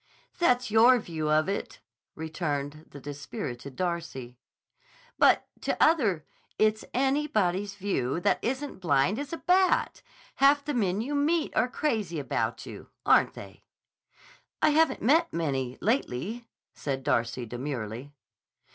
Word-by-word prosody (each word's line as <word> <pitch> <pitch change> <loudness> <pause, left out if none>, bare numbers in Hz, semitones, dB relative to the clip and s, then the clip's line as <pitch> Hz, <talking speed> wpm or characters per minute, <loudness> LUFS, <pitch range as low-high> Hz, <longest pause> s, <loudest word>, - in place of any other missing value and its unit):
"That's 250 -8 +2
your 235 +4 +7
view 160 -8 -3
of 155 +2 +3
it," 200 - -4 0.4
returned 155 -2 -4
the 140 - -11
dispirited 140 - -7
Darcy. 165 -9 -4 0.8
"But - - +4
to - - -1
other—" 220 - +3 0.3
"It's 215 0 +2
anybody's 230 -8 0
view 165 -8 -1
that - - +2
isn't 265 -2 -3
blind 170 - +2
as 285 -1 -5
a 330 - -3
bat! 370 +2 +2 0.4
Half 280 +1 +4
the 295 - -2
men 200 -5 0
you 275 +6 -4
meet 300 +3 +1
are 225 +3 +2
crazy 220 - -1
about 145 - -2
you. - - -10 0.2
Aren't - - +4
they?" - - -11 1.0
"I - - +4
haven't 320 +2 +2
met 300 +9 +3
many, 135 -6 -2
lately," 225 - -1 0.3
said 135 -2 -4
Darcy 120 +1 0
demurely. 120 +1 -5
185 Hz, 130 wpm, -28 LUFS, -, 1.0 s, your